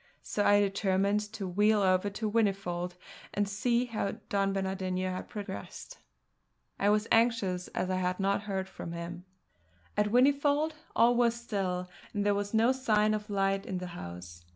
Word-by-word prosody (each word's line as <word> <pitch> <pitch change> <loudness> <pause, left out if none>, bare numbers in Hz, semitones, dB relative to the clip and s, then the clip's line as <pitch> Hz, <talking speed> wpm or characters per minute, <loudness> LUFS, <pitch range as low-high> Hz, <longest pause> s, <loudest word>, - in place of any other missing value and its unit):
So 205 - -1
I 205 0 +5
determined 195 0 +2
to 205 -4 -4
wheel 205 +3 +3
over 185 +1 +3
to 210 +1 -3
Whinnyfold 195 -5 0 0.4
and 205 0 +1
see 235 +5 +1
how 220 -4 -2 0.2
Don 195 -1 +1
Bernardino 190 -1 -2
had 185 - -6
progressed. 205 -2 -7 0.8
I 200 - +3
was 210 +1 +2
anxious, 225 -6 +2
as 185 - -1
I 185 - +1
had 180 0 -1
not 195 +1 +1
heard 190 -1 -2
from 170 -2 -7
him. 170 +1 -6 0.7
At 210 0 +2
Whinnyfold 285 +6 +3 0.2
all 235 +1 +5
was 235 -1 +3
still, 195 -6 -2 0.3
and 205 0 0
there 205 - +4
was 200 0 -2
no 225 +3 +4
sign 215 -5 +2
of 210 0 -3
light 195 -1 +1
in 185 - -2
the 180 - -4
house. 85 - -9
200 Hz, 165 wpm, -30 LUFS, 185-215 Hz, 0.8 s, I